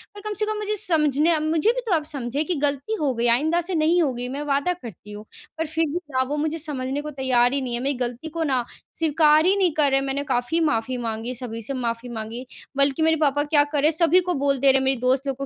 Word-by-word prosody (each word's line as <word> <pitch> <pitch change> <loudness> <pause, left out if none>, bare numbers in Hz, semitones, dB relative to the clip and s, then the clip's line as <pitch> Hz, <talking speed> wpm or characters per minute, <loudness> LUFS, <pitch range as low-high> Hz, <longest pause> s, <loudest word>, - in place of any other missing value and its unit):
और 410 - -9
कम 425 0 -4
से 425 - +1
कम 430 0 -2
मुझे 425 0 -2
समझने 310 -1 +2
मुझे 315 +7 +2
भी - - -3
तो 400 - 0
आप 310 - 0
समझे 280 0 -3
कि 355 +1 -2
गलती 285 +9 0
हो 280 -4 +1
गई 235 +1 0
आइंदा 310 +9 +2
से 355 +1 -4
नहीं 330 +3 +3
होगी। 250 -4 -1
मैं 280 +3 -4
वादा 285 +5 +1
करती 215 - -11
हूँ" 210 +1 -9 0.3
पर 325 - -1
फिर 320 +1 0
भी 345 +4 -2
ना 260 0 +2
वो 295 - -2
मुझे 315 +2 -2
समझने 280 -2 -3
को 300 0 -6
तैयार 255 -2 +2
ही 280 - 0
नहीं 245 -2 -4
है, 240 - -1
मेरी 275 +3 0
गलती 245 +4 -4
को 330 +1 -3
ना 260 -5 +1 0.3
स्वीकार 310 0 +4
ही 385 +2 +4
नहीं 365 -4 +3
कर 295 -2 +3
रहे 270 - +3
हैं। 275 - -3
मैंने 275 +1 -2
काफ़ी 260 +4 0
माफ़ी 255 -5 0
माँगी, 230 +1 -3
सभी 230 -2 -6
से 275 +6 -5
माफ़ी 240 -1 -3
माँगी, 230 +2 -6 0.3
बल्कि 275 +2 +2
मेरे 320 0 +4
पापा 290 0 +2
क्या 290 -1 +3
कर 290 -1 -2
रहे 305 +2 +4
सभी 335 +2 +4
को 360 0 -2
बोल 275 -1 +1
दे 275 - +2
रहे 270 - +3
हैं, - - -2
मेरी 265 -1 +1
दोस्त 260 +2 +1
लोगों 275 +1 -3
285 Hz, 265 wpm, -23 LUFS, 255-320 Hz, 0.3 s, स्वीकार